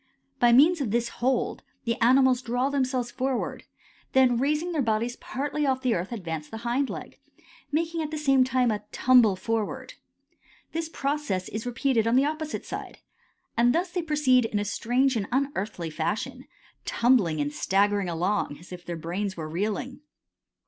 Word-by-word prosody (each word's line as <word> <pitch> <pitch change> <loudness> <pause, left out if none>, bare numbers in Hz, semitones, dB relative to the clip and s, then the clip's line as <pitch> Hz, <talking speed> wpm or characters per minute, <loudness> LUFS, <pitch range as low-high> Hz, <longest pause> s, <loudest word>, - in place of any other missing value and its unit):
By 240 -1 +5
means 305 +7 +6
of 255 - -1
this 235 +2 0
hold 260 +2 -1 0.2
the 230 - 0
animals 255 +1 +5
draw 250 +2 0
themselves 255 -3 0
forward, 260 0 -2 0.5
then 255 -3 +4
raising 300 +6 0
their 315 -4 0
bodies 230 +1 0
partly 290 +3 -3
off 260 0 0
the 250 -2 +2
earth 180 +3 -3
advance 165 -8 -5
the 225 - -6
hind 255 +3 +1
leg, - - -8 0.5
making 330 +2 0
at 310 - -3
the 310 - -4
same 270 -3 +4
time 255 -2 +2
a 210 - -2
tumble 245 -6 +5
forward. 220 +2 -3 0.8
The 330 - -1
process 275 - -2
is 215 +2 -5
then - - -1
repeated 245 -2 +1
on 230 - +3
the 265 +2 +5
opposite 310 +1 -3
side, - - -7 0.6
and 240 +1 +4
thus 350 +1 0
they 355 0 -1
proceed 295 -6 +3
in 220 - -2
a 205 - -1
strange 250 +5 +1
and 205 -3 -1
unearthly 215 - -2
fashion, 160 +7 -3 0.4
tumbling 230 -11 +2
and 145 0 -1
staggering 200 +2 +1
along 170 -2 -1
as 170 +5 -16
if 180 -1 -8
their 170 -1 -5
brains 185 +4 -3
were 155 -2 -4
reeling. 210 +10 -3
245 Hz, 170 wpm, -26 LUFS, 205-270 Hz, 0.8 s, means